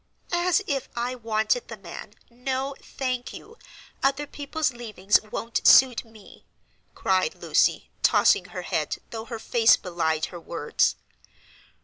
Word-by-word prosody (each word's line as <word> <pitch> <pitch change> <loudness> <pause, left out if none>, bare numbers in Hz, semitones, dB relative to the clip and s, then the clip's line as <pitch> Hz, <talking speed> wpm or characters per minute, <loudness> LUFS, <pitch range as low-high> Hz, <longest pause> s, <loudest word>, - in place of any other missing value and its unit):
"As 350 +3 +2
if 275 -2 -2
I 240 +1 -2
wanted 225 0 0
the 230 - -8
man! 195 +2 -10 0.2
No, 265 +3 -3
thank 255 -2 -4
you, 460 - -12 0.4
other 275 +2 +1
people's 290 +1 -2
leavings 215 -4 +1
won't 225 +2 -3
suit 255 -3 +7
me," 220 -3 -17 0.5
cried 185 -1 +1
Lucy, - - +1
tossing - - +4
her - - -7
head, - - -2
though 225 -1 -6
her 230 0 -6
face 225 0 +4
belied 160 -3 -1
her 175 - -7
words. 165 -2 0
235 Hz, 130 wpm, -25 LUFS, 210-270 Hz, 0.5 s, suit